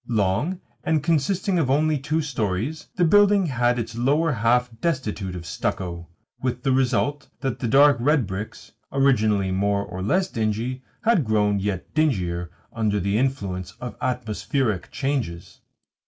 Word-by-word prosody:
Long, 110 - 0 0.2
and 155 -3 +1
consisting 175 +4 +1
only 155 +2 +2
of - - -8
two 155 +3 0
storeys, 120 +2 -2
the 180 - +3
building 205 +2 +5
had 120 -4 +1
its 115 -1 -4
lower 145 +7 +2
half 125 +1 +2
destitute 110 - -2
of 85 -1 -7
stucco; 85 -1 -3 0.3
with 125 -1 -2
the 135 - +2
result 130 +1 +1
that 135 -3 -2
the 120 - -1
dark 140 +3 +6
red 145 0 +3
bricks, 95 +2 -7 0.2
originally 110 -8 +2
more 100 +1 +1
or 95 -2 -7
less 185 - +1
dingy, 115 - -2 0.2
had 225 -8 +3
grown 105 -3 +2
yet 95 -2 -3
dingier 90 - 0 0.2
under 105 -2 0
the 100 +2 0
influence 100 -9 -2
of 120 -4 -6
atmospheric 120 -2 -1
changes. 130 -12 -3
125 Hz, 145 wpm, -24 LUFS, 100-145 Hz, 0.3 s, dark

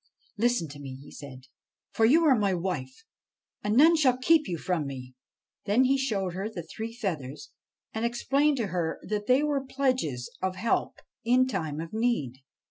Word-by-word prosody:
' - - -35
Listen 240 -6 +2
to 145 0 -10
me,' 135 -2 -7
he 140 +1 -13
said; 130 -3 -10 0.2
' - - -66
for 225 - +3
you 310 +9 +5
are 290 - +6
my 200 -4 +1
wife, 170 -3 -4 0.6
and 210 +2 +1
none 325 +5 +7
shall 265 -6 +3
keep 310 +4 +3
you 175 - -2
from 160 -3 -1
me.' 130 -2 -8 0.5
Then 215 +5 +4
he 265 +1 +3
showed 205 -9 -1
her 195 +4 -3
the 180 -6 -6
three 220 +7 -6
feathers, 155 - -5 0.4
and 220 - -3
explained 275 +5 +1
to 230 -4 -1
her 170 -3 -1
that 210 0 -3
they 255 +3 +4
were 290 -2 0
pledges 255 - -1
of 185 0 -1
help 215 +5 0 0.3
in 250 +2 +4
time 160 - -3
of 165 +3 -6
need. 220 - 0
210 Hz, 190 wpm, -28 LUFS, 160-255 Hz, 0.6 s, none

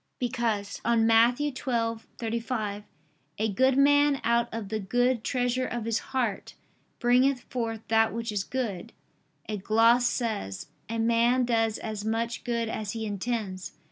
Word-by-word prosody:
Because 235 -5 -2
on 230 -1 +3
Matt. 230 +2 +5
12:35, 230 -4 -3 0.5
"A 220 +1 0
good 260 +6 +2
man 285 0 +4
out 235 0 +2
of 220 -3 -5
the 220 0 -2
good 245 +4 +1
treasure 250 0 0
of 240 -2 -4
his 230 0 0
heart 245 -7 -2 0.4
bringeth 250 +2 +3
forth 225 -3 -2
that 225 0 +4
which 230 0 -3
is 205 -2 -1
good," 230 -4 -4 0.5
a 215 - -3
gloss 230 +5 +4
says: 210 - -3 0.2
"A 230 - -2
man 235 +2 +3
does 225 -2 +1
as 215 -2 -5
much 225 +1 -2
good 235 -2 -1
as 215 -2 -4
he 225 -1 -4
intends." 205 -2 -3
230 Hz, 140 wpm, -27 LUFS, 220-245 Hz, 0.5 s, Matt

